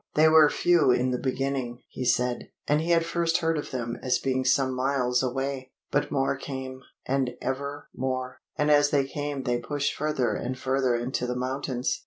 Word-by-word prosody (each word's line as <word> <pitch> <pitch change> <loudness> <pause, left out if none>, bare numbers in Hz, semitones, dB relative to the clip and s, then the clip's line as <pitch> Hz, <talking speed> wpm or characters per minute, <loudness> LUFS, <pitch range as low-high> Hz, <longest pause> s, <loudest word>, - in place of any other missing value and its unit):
They 155 +1 +6
were 155 -1 +7
few 175 -4 +3
in 125 +1 +3
the 125 - -1
beginning, 130 -2 -2
he 130 - -5
said, 125 0 +1 0.2
and 150 +1 +3
he 165 - -3
had 165 -1 +4
first 170 -1 +1
heard 165 -1 0
of 150 - -4
them 120 -2 -4
as 125 -1 +2
being 130 0 -1
some 130 0 +2
miles 125 -1 +1
away. 135 +1 -2 0.2
But 145 - +1
more 135 -1 +1
came, 130 -1 -6 0.2
and 135 -1 +1
ever 140 +2 -4
more; 130 0 -3 0.2
and 150 0 +2
as 145 0 +5
they 140 -2 +2
came 145 -1 -4
they 120 -1 0
pushed 145 +3 -2
further 150 -4 0
and 130 0 -3
further 130 -1 +1
into 125 +1 -2
the 125 - -2
mountains. 130 0 -2
130 Hz, 190 wpm, -27 LUFS, 125-145 Hz, 0.2 s, were